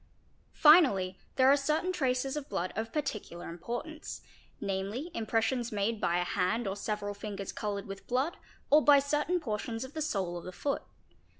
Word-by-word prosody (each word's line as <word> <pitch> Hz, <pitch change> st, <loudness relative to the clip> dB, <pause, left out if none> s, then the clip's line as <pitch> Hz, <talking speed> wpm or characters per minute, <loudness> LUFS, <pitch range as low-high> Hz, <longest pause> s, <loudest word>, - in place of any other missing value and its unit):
Finally 255 Hz, -, +6 dB, 0.2 s
there 260 Hz, -1 st, +5 dB
are -, -, +7 dB
certain 305 Hz, +6 st, 0 dB
traces 270 Hz, -5 st, 0 dB
of 295 Hz, -2 st, -5 dB
blood 185 Hz, -2 st, -2 dB
of 225 Hz, +2 st, -3 dB
particular 215 Hz, -, -4 dB
importance, 240 Hz, -, -6 dB, 0.4 s
namely 200 Hz, -, -3 dB
impressions 230 Hz, +1 st, 0 dB
made 210 Hz, +1 st, -1 dB
by 170 Hz, -, +2 dB
a 180 Hz, -, +2 dB
hand 200 Hz, +5 st, 0 dB
or 195 Hz, -, -2 dB
several 205 Hz, 0 st, -3 dB
fingers 200 Hz, -1 st, -5 dB
coloured 205 Hz, -2 st, -3 dB
with 195 Hz, -1 st, -8 dB
blood 265 Hz, +7 st, 0 dB, 0.4 s
or 300 Hz, +1 st, +7 dB
by 290 Hz, -1 st, +8 dB
certain 295 Hz, +5 st, +1 dB
portions 225 Hz, -3 st, -3 dB
of 260 Hz, +2 st, -9 dB
the 315 Hz, -, -3 dB
sole 195 Hz, -, -1 dB
of -, -, -12 dB
the 185 Hz, -, -6 dB
foot. 280 Hz, +9 st, -2 dB
225 Hz, 170 wpm, -31 LUFS, 200-285 Hz, 0.4 s, by